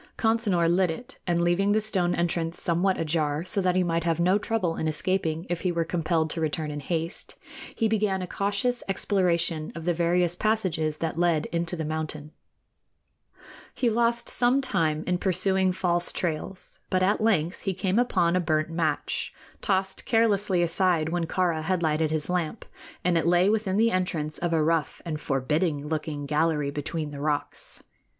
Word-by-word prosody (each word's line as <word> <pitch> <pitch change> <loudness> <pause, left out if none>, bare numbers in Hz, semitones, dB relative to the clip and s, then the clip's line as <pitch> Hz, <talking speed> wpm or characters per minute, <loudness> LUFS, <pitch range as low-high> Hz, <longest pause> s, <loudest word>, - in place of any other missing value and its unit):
Consinor 220 -7 +2
lit 180 +1 +3
it, 200 +10 -7
and, 170 -1 +2
leaving 190 +4 +2
the 215 - +3
stone 190 -5 0
entrance 170 0 0
somewhat 180 +3 +2
ajar, 155 0 0
so 195 +2 0
that 180 -1 +1
he 185 - +3
might 165 -1 0
have 165 -1 0
no 185 +4 +3
trouble 205 -7 -1
in 160 - -2
escaping 165 0 -1
if 175 -1 -3
he 180 - 0
were 170 -1 0
compelled 165 -1 0
to 165 - -3
return 155 0 -2
in 145 - -4
haste, 165 +3 -4 0.4
he 225 - +1
began 210 -3 0
a - - -5
cautious 205 +7 -1
exploration 170 -5 0
of 165 -1 -7
the 175 - +2
various 175 +1 +2
passages 180 -8 0
that 165 0 -3
led 170 -3 +2
into 170 +1 -1
the 160 -2 -3
mountain. 155 -1 -4 1.4
He 240 -3 +1
lost 235 +1 +1
some 245 +2 +3
time 160 - 0
in 180 -1 0
pursuing 190 0 +2
false 175 -1 +1
trails; 175 +2 -4
but 185 0 +2
at 205 +4 +2
length 185 -6 +1
he 195 -2 -2
came 190 +3 +1
upon 180 -8 +2
a - - +3
burnt 155 -2 0
match, 165 -1 -1 0.3
tossed 190 -1 -1
carelessly 205 -5 +2
aside 170 -2 +1
when 170 0 -1
Kāra 170 -3 0
had 175 +2 -1
lighted 155 0 +1
his 155 -1 -2
lamp, 180 +3 -2 0.4
and 175 -2 +3
it 165 - -1
lay 175 +3 +4
within 210 -3 0
the 230 +1 +4
entrance 160 -5 -1
of 175 -1 -1
a 160 -2 +2
rough 165 -1 0
and 155 -3 -4
forbidding 145 +3 0
looking 150 -2 -3
gallery 150 -1 +1
between 150 +1 -4
the 140 -1 -7
rocks. 150 -1 -3
175 Hz, 175 wpm, -26 LUFS, 160-190 Hz, 1.4 s, lay